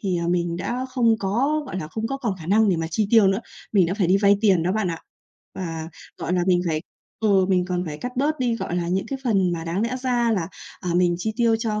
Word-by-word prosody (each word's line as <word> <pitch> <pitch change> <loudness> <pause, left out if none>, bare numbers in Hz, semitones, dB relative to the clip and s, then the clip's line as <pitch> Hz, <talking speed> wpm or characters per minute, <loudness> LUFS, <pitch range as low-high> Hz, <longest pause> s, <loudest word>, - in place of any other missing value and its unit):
thì, 185 -4 -1
à, 170 0 -2
mình 175 -1 0
đã 245 +8 -3
không 235 -4 +2
có, 260 +10 0
gọi 185 - -5
là, 155 - -5
không 220 +6 -3
có 270 - -3
còn 230 -7 -2
khả 160 - -8
năng 215 +3 +4
để 180 - +2
mà 165 - -2
chi 205 +5 0
tiêu 225 -4 +6
nữa. 195 +2 +2 0.3
Mình 190 -5 +4
đã 185 - -1
phải 195 -5 +1
đi 185 +2 +4
vay 200 0 +4
tiền 195 -6 +4
đó 180 - 0
bạn 215 -3 0
ạ, 165 - -4 0.6
và, 165 -3 -5 0.3
gọi - - -3
là, 180 -1 +2
mình 180 -1 +4
phải 155 -1 -1 0.4
ừ, 195 -3 +4
mình 180 -2 +2
còn 180 0 -1
phải 150 -1 -5
cắt 250 +1 -6
bớt 295 +3 +1
đi, 240 -2 +1
gọi 175 - -3
là, 170 -1 -1
những 190 +2 -1
cái 275 - -4
phần 195 -6 +2
mà 165 -1 -4
đáng 170 +4 -2
lẽ 240 +3 -1
ra 245 -2 +1
là, 185 -5 -1 0.3
à, 180 - -3
mình 175 -1 +3
chi 220 +4 -2
tiêu 230 -2 +3
cho 215 -2 -2
195 Hz, 275 wpm, -23 LUFS, 175-230 Hz, 0.6 s, tiêu